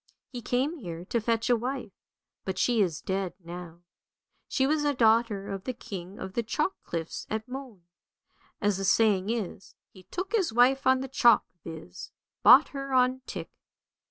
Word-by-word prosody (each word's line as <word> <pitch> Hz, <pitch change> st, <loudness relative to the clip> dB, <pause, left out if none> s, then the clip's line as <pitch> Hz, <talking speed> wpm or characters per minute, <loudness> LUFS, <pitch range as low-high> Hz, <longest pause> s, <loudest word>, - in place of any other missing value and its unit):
He 245 Hz, -2 st, -6 dB
came 265 Hz, +8 st, -1 dB
here 170 Hz, -5 st, -7 dB
to 235 Hz, +4 st, -1 dB
fetch 230 Hz, +1 st, 0 dB
a 245 Hz, -, +4 dB
wife, 245 Hz, -1 st, -4 dB, 0.5 s
but 190 Hz, -1 st, -4 dB
she 225 Hz, +4 st, +2 dB
is 170 Hz, -6 st, 0 dB
dead 190 Hz, -1 st, -2 dB
now. 175 Hz, -1 st, -9 dB, 0.6 s
She 265 Hz, -, +1 dB
was 300 Hz, +2 st, +1 dB
a 290 Hz, -1 st, +1 dB
daughter 225 Hz, -3 st, +3 dB
of 195 Hz, 0 st, -5 dB
the 255 Hz, -, -2 dB
king 195 Hz, -5 st, -8 dB
of 190 Hz, -, -7 dB
the 235 Hz, -, 0 dB
chalk 300 Hz, -, -1 dB
cliffs 165 Hz, -1 st, -5 dB
at 220 Hz, +1 st, -3 dB
Moen. 250 Hz, -8 st, -8 dB, 0.8 s
As 205 Hz, -3 st, +1 dB
the 195 Hz, -, -3 dB
saying 200 Hz, -1 st, +3 dB
is, 220 Hz, -4 st, -4 dB
' -, -, -57 dB
he 185 Hz, -, -14 dB
took 370 Hz, +2 st, -5 dB
his 380 Hz, -, +1 dB
wife 255 Hz, +3 st, +4 dB
on 260 Hz, 0 st, +4 dB
the 265 Hz, -, -4 dB
chalk,' 240 Hz, -3 st, +4 dB, 0.2 s
viz., 155 Hz, -, -9 dB, 0.3 s
bought 265 Hz, +5 st, +8 dB
her 275 Hz, -1 st, -6 dB
on 255 Hz, 0 st, +3 dB
tick. -, -, -6 dB
230 Hz, 180 wpm, -28 LUFS, 190-260 Hz, 0.8 s, bought